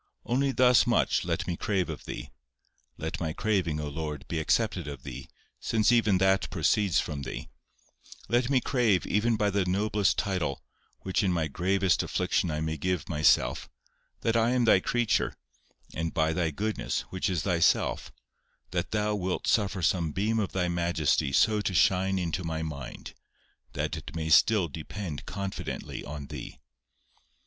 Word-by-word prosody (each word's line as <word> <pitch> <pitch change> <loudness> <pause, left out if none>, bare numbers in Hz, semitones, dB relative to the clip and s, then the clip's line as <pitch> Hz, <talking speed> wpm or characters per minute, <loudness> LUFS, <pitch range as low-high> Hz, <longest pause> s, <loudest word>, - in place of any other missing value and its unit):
Only 135 +3 +1
thus 125 -2 +5
much - - +2
let - - -1
me 85 - -2
crave 95 -1 -1
of 80 -3 -7
Thee, - - -7 0.7
(let - - -4
my 80 -2 -2
craving, 95 -8 0
O 75 - -3
Lord, 75 -1 -5
be 80 - -2
accepted 90 0 0
of 70 -3 -7
Thee, 65 -4 -8 0.3
since 110 +1 +2
even 110 -5 +4
that 95 +1 +2
proceeds 95 +3 +2
from 75 -2 -3
Thee,) 70 - -6 0.8
let 120 +1 +1
me 135 -2 +4
crave, 115 -9 +2
even 110 +4 +1
by 105 -1 +1
the 100 -1 +1
noblest 100 -1 +1
title, 90 -9 -1 0.4
which 95 -1 0
in 95 -3 +1
my 80 -3 0
greatest 95 +4 +1
affliction 90 - 0
I 75 0 -2
may 80 0 -2
give 90 0 -2
myself, 75 -2 +2 0.5
that 115 - +1
I 115 0 +3
am 125 -2 +2
Thy 110 - +6
creature, 120 +3 0 0.6
and 80 0 -2
by 80 0 +1
Thy 85 -1 0
goodness 105 +8 -2
(which 95 +1 -1
is 90 -4 -1
Thyself) 85 -4 +1 0.6
that - - -2
Thou 105 0 0
wilt 95 -3 -2
suffer 100 -4 +1
some 80 -2 +1
beam 110 +3 0
of 100 - -1
Thy 90 -1 0
majesty 85 -5 +1
so 105 +9 +3
to 95 -3 -2
shine 95 +4 +3
into 90 -1 -2
my 80 -1 -3
mind, 70 -5 -7 0.6
that - - -2
it 70 - -8
may 80 -1 -2
still 95 +4 +5
depend 80 +2 -6
confidently 100 -1 -5
on 75 -1 -7
Thee." - - -8
90 Hz, 165 wpm, -28 LUFS, 80-105 Hz, 0.8 s, Thy